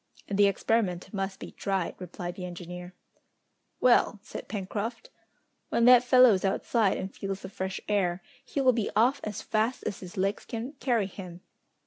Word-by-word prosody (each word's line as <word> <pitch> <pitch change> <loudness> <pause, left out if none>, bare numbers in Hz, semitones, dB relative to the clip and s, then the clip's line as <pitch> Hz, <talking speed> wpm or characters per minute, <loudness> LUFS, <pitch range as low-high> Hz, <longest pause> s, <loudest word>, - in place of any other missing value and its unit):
"The 200 0 +4
experiment 200 -2 0
must 195 -1 -3
be - - -8
tried," 195 -3 -2
replied 175 0 -6
the 185 - -8
engineer. 180 0 -7 0.8
"Well!" 245 -2 +4
said - - -8
Pencroft. 215 - -4 0.6
"When 235 - +2
that 250 0 +8
fellow 250 -2 +7
is 185 - -1
outside, 200 +2 +1
and 190 +1 -5
feels 195 -1 -4
the - - -7
fresh 190 0 -4
air, 190 -3 0 0.2
he 275 - -2
will 255 -1 +5
be 225 -3 -1
off 245 +5 +3
as 210 -2 -5
fast 220 +4 0
as - - -3
his 180 -1 -10
legs 195 +2 0
can 235 +3 -5
carry 240 -5 +1
him!" 185 -2 -9
200 Hz, 165 wpm, -28 LUFS, 185-230 Hz, 0.8 s, that